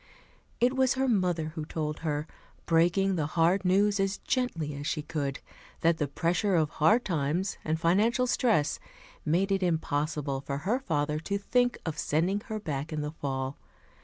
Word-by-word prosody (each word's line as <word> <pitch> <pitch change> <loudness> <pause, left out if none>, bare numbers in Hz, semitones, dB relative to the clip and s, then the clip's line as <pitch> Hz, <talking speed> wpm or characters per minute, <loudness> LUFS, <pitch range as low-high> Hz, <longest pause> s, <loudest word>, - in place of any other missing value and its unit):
It 245 +2 +3
was 260 -1 +3
her 265 +1 +1
mother 180 -8 +1
who 160 0 -5
told 150 -1 -3
her, 150 -2 -2 0.4
breaking 175 +3 +3
the 150 -2 0
hard 175 +4 +4
news 200 +2 +3
as 195 0 0
gently 170 - -1
as 145 +1 -5
she 150 - -1
could, 145 -4 -3 0.4
that 165 0 +3
the 150 - +1
pressure 180 +7 +1
of 155 -2 +2
hard 215 +12 +3
times 165 +2 -1
and 160 +1 -1
financial 215 +9 +3
stress 225 - +2 0.5
made 180 +6 +1
it 195 0 +2
impossible 150 -4 -1
for 140 0 -4
her 235 +6 +2
father 150 - -1
to 200 +5 -2
think 245 +4 +1
of 160 -3 -3
sending 175 +7 +1
her 220 -1 -3
back 150 -5 -4
in 155 -1 -2
the 150 0 -3
fall. 135 -3 -3
165 Hz, 170 wpm, -29 LUFS, 150-200 Hz, 0.5 s, hard